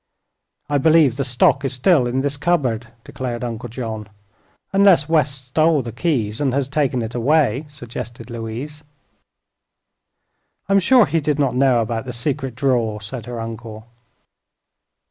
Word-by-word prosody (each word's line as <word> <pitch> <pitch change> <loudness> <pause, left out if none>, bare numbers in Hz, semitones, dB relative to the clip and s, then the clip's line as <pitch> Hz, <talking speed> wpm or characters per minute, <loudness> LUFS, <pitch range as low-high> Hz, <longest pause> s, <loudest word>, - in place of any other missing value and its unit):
"I 145 -1 +1
believe 155 -3 +4
the 140 - 0
stock 135 +2 +2
is 135 - -1
still 130 0 +3
in 130 +2 -1
this 145 +1 -1
cupboard," 135 -7 0 0.2
declared 125 -2 -5
Uncle 120 0 -5
John. 110 -3 -6 0.6
"Unless 195 -6 +5
West 140 -5 0
stole 155 +1 +2
the 115 - -6
keys 120 -4 -1
and 135 -3 +1
has 140 -2 0
taken 135 -4 0
it 110 - -6
away," 135 +1 +2
suggested 120 -4 -8
Louise. 120 +7 -6 1.8
"I'm 195 +1 +4
sure 240 +4 +5
he 165 - 0
did 145 0 0
not 140 -3 +1
know 130 -2 +3
about 115 +1 -3
the 125 - -6
secret 130 0 -3
drawer," 120 -5 0
said 115 +2 -8
her 120 -1 -5
uncle. 115 -1 -7
130 Hz, 145 wpm, -20 LUFS, 115-150 Hz, 1.8 s, Unless